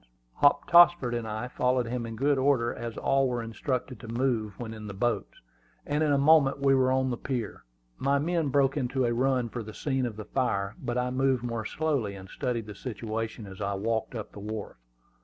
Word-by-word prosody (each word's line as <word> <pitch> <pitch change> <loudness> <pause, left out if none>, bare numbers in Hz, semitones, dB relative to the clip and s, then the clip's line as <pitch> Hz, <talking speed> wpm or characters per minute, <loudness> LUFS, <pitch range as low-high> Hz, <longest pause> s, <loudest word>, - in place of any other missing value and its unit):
Hop 145 0 +4
Tossford 175 -7 +6
and 120 -1 -2
I 110 +3 -3
followed 125 0 +1
him 120 0 -3
in 115 - -6
good 140 +3 +2
order, 130 -3 +2
as 115 -1 -6
all 135 0 +2
were 120 -2 -2
instructed 125 +2 -3
to 115 - -10
move 115 -4 -1
when 110 -2 -5
in 110 -1 -8
the 100 - -7
boats; 110 0 -1 0.5
and 145 +1 0
in 150 - +2
a 140 - +4
moment 140 -1 +5
we 140 -1 +3
were 130 -1 +3
on 130 0 +1
the 120 - -2
pier. 125 -5 -4 0.3
My 140 +1 +2
men 165 +1 0
broke 135 -1 +2
into 130 -2 0
a 120 - +1
run 130 0 +1
for 120 +1 -5
the 110 -1 -9
scene 135 -3 -1
of 110 - -6
the 110 0 -7
fire; 100 -6 -1
but 120 0 -2
I 125 0 0
moved 130 -1 +1
more 115 -2 -3
slowly, 140 -9 -1
and 95 -1 -11
studied 120 -3 -2
the 105 - -8
situation 110 0 -5
as 95 0 -10
I 100 0 -1
walked 110 +3 -2
up 110 -3 -6
the - - -10
wharf. 105 - -6
120 Hz, 215 wpm, -28 LUFS, 110-135 Hz, 0.5 s, Tossford